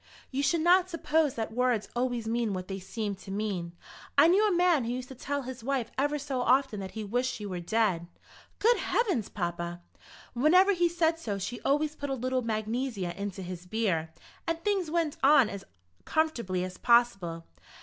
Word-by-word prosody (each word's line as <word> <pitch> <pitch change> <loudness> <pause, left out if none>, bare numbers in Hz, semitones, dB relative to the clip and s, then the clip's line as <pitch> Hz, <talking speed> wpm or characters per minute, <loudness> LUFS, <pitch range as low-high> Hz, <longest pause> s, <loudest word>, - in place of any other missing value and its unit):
You 270 +1 -1
should 325 +3 +2
not 360 +2 +5
suppose 320 -4 +1
that 225 -1 -3
words 245 -3 +1
always 240 -2 -1
mean 230 -2 0
what 185 -1 -4
they 195 0 -4
seem 205 +2 -4
to 195 - -13
mean. 195 -4 -3 0.4
I - - +8
knew 400 +5 +4
a - - +1
man 350 -5 +3
who 230 - -2
used 255 0 -5
to - - -7
tell 280 +2 -3
his 255 -2 -7
wife 260 -3 -1
ever 290 +2 +1
so 275 -3 -3
often 250 -4 +2
that 190 -1 -6
he 220 - -3
wished 245 +5 0
she 210 - -6
were 185 -3 -4
dead." 180 -2 0 0.5
"Good 465 +4 +4
heavens, 375 - 0
papa!" 175 -2 -3 0.5
"Whenever 365 +10 +5
he 350 -2 +2
said 330 -1 +1
so 210 -10 -3
she 240 +5 -5
always 295 +2 +1
put 285 -1 -5
a 270 - 0
little 255 +1 -1
magnesia 220 -3 -2
into 200 -1 -5
his 180 0 -7
beer, 180 -7 0 0.4
and 330 0 -1
things 390 -5 0
went 325 -2 0
on 270 -5 +6
as 200 -1 -7 0.4
comfortably 235 - 0
as 185 0 -6
possible. 195 -9 +2
245 Hz, 190 wpm, -29 LUFS, 200-300 Hz, 0.5 s, I